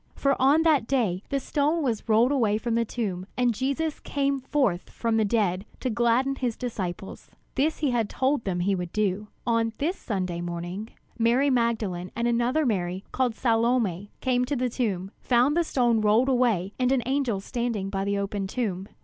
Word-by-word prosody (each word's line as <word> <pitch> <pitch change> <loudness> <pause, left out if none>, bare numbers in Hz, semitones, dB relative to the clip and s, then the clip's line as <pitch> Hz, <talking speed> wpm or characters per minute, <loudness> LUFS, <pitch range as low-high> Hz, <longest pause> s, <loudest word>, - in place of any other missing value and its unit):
For 275 0 +2
on 285 +5 +5
that 300 -8 +3
day 220 -9 +1
the 275 - 0
stone 295 +4 0
was 230 -4 -2
rolled 225 +4 +4
away 225 -7 +2
from 230 +1 -2
the 230 0 +2
tomb 195 -6 -3
and 245 -1 +2
Jesus 280 +6 -2
came 280 -1 -1
forth 260 -9 0
from 230 -1 -1
the 220 - +3
dead 200 -4 +1 0.2
to 255 - -1
gladden 240 +4 +2
his 245 -4 -2
disciples. 195 -6 -5 0.2
This 300 +4 +1
he 290 -4 0
had 230 -4 0
told 265 -1 0
them 180 -3 -1
he 195 +3 +1
would 180 -2 -3
do. 210 0 -1 0.2
On 230 -1 +1
this 330 +6 0
Sunday 185 -6 -3
morning, 175 +5 -5 0.3
Mary 245 +5 +3
Magdalene 220 -7 0
and 235 +1 0
another 240 +6 +1
Mary, 185 -4 -1
called 250 -3 0
Salome, 225 -6 +1
came 250 -1 +2
to 285 +3 -2
the 250 -1 0
tomb, 200 -6 -2
found 250 +4 +3
the 345 - +3
stone 240 -7 +2
rolled 215 +5 +3
away 230 -7 +1
and 250 0 +2
an 265 -3 +2
angel 260 -6 0
standing 225 -3 -3
by 195 -1 -1
the 200 0 0
open 200 0 -2
tomb. 195 -3 -3
235 Hz, 185 wpm, -26 LUFS, 200-260 Hz, 0.3 s, on